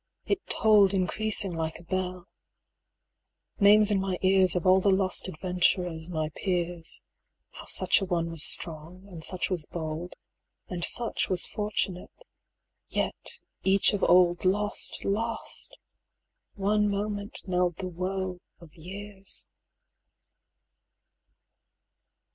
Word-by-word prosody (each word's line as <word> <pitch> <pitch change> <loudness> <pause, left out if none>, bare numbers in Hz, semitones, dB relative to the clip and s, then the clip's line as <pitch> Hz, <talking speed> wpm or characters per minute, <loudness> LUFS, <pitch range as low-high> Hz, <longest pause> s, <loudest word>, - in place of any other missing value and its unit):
it 400 - 0
tolled 205 -3 +4
Increasing 195 0 0
like 160 -1 -3
a - - -13
bell. 180 0 -3 1.3
Names 210 +1 +6
in 200 - +2
my 190 -2 -2
ears 185 -1 +4
Of 180 - -1
all 185 +1 +6
the 200 - +3
lost 190 -1 +2
adventurers 180 -1 0
my 155 -3 -2
peers 175 -1 -2 0.5
195 - - -13
How - - -9
such - - +2
a - - -1
one 170 -2 -1
was 165 -2 -2
strong, 170 +6 -2
and 170 -5 -9
such 185 +2 -2
was 170 -5 -1
bold, 160 +1 -5 0.5
And 175 -2 -5
such 235 +4 +1
was 185 -2 +2
fortunate, 210 - -3 0.6
yet - - -3 0.2
each 195 +2 +4
of 200 - -1
old 175 -1 +4
Lost, 205 +3 +1
lost! 225 +3 -3 0.8
one 210 +1 +2
moment 205 +1 -3
knelled 180 -2 0
the 185 - -4
woe 185 +1 -3 0.2
of 165 -3 -15
years. 195 +3 -5
185 Hz, 120 wpm, -28 LUFS, 175-200 Hz, 1.3 s, Names